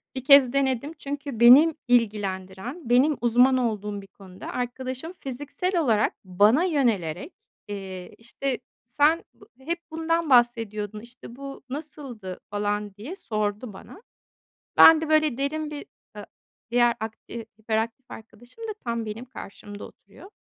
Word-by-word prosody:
1 260 - -4
kez 275 -2 +7
denedim. 275 +2 0
Çünkü 280 -3 -5
benim 275 +7 +8
ilgilendiren 210 - -1
benim 265 +4 +4
uzman 245 +2 +4
olduğum 210 -4 -2
bir 195 - -14
konuda 190 -1 -12
arkadaşım 255 +5 -4
fiziksel 290 +8 -3
olarak 220 -7 +2
bana 205 - +4
yönelerek, 235 - 0 0.3
eee, 190 -3 -7
işte, 250 +3 -3 0.3
"Sen 290 +7 +2
bu - - -19
hep 335 +6 -3
bundan 325 0 -1
bahsediyordun. 225 -4 +2
İşte, 235 +1 -13
bu 275 0 -9
nasıldı?" 260 - -7
falan 205 0 -2
diye 240 - -7
sordu 215 - -3
bana. 370 - -13 0.8
Ben 320 -1 +9
de, 320 - -3
böyle, 310 -5 +3
derin 300 +2 -2
bir 290 -1 -7 0.3
ı 205 - -7 0.5
diğer 240 0 +4
ark 220 0 -5
eee, 230 -1 -7
hiperaktif 225 +3 -3
arkadaşım 240 - -13
da 430 - -3
tam 235 -2 -2
benim 215 +3 -6
karşımda 205 -4 -10
oturuyor. 275 - -16
240 Hz, 135 wpm, -25 LUFS, 210-285 Hz, 0.8 s, Ben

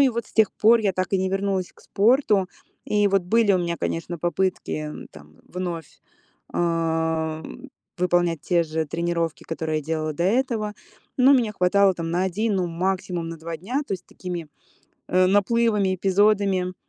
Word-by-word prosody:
и 275 - +6
вот 235 -3 -3
с - - -20
тех 220 -3 +4
пор 230 +2 +4
я 200 -3 +1
так 185 0 -2
и 195 - +3
не 190 0 0
вернулась 195 -1 -1
к - - -22
спорту. 210 -3 +2 0.4
И 205 -1 +2
вот 195 -1 +2
были 215 +3 +3
у 185 - +3
меня, 170 -1 -2
конечно, 170 +1 -3
попытки 175 -3 -2 0.2
там 75 0 -15
вновь, 175 -4 -6 0.5
э, 160 -2 0 0.6
выполнять 175 -3 +1
те 175 -2 +2
же 160 0 -2
тренировки, 170 0 -2
которые 160 -1 -2
делала 155 +1 -2
до 170 +4 -2
этого. 220 0 0 0.4
Но 260 +2 +6
меня 240 -6 +2
хватало 195 0 +3
там 165 -1 -4
на 175 +2 0
один, 205 +3 0
ну, 185 -2 0
максимум 175 0 -2
на 165 0 -7
два 165 +1 -6
дня, 240 - -3
то - - -4
есть 185 -1 -9
такими, 175 -4 -6 0.6
э, 185 0 +4
наплывами, 205 -1 +2
эпизодами. 195 -1 +2
185 Hz, 165 wpm, -24 LUFS, 165-205 Hz, 0.6 s, и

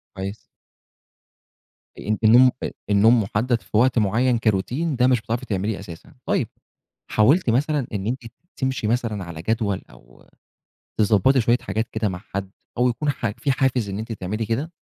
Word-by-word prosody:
كويس. 100 +2 -5 1.6
أنتِ 110 +1 -2
النوم 125 +4 +7
آآ - - -2 0.2
النوم 110 +3 +5
محدد 115 +4 0
في 105 - -3
وقت 125 0 +4
معين 115 +4 +2
كroutine 130 - 0
ده 125 - +5
مش 125 -3 +3
بتعرفي 120 +4 -3
تعمليه 100 0 -2
أساسًا. 85 -4 -11
طيب، - - 0 0.6
حاولتِ 130 +7 +4
مثلًا 145 +2 +1
إن 100 +1 -3
أنتِ 125 +1 -3 0.3
تمشي 130 -5 -1
مثلًا 115 -4 -1
على 85 -2 -8
جدول 105 -2 0
أو - - -19 0.7
تضبّطي 110 +5 +4
شوية 120 +2 +3
حاجات 110 +1 -2
كده 110 -2 -1
مع 90 -1 -5 0.2
حد، 95 -1 -3 0.3
أو 125 0 +3
يكون 135 +5 -2
ح 120 -4 -1
في 140 - 0
حافز 130 -5 +1
إن 100 +2 -4
أنتِ 115 +1 -6
تعملي 110 +1 -3
كده؟ 135 +10 -2
115 Hz, 160 wpm, -23 LUFS, 100-125 Hz, 1.6 s, النوم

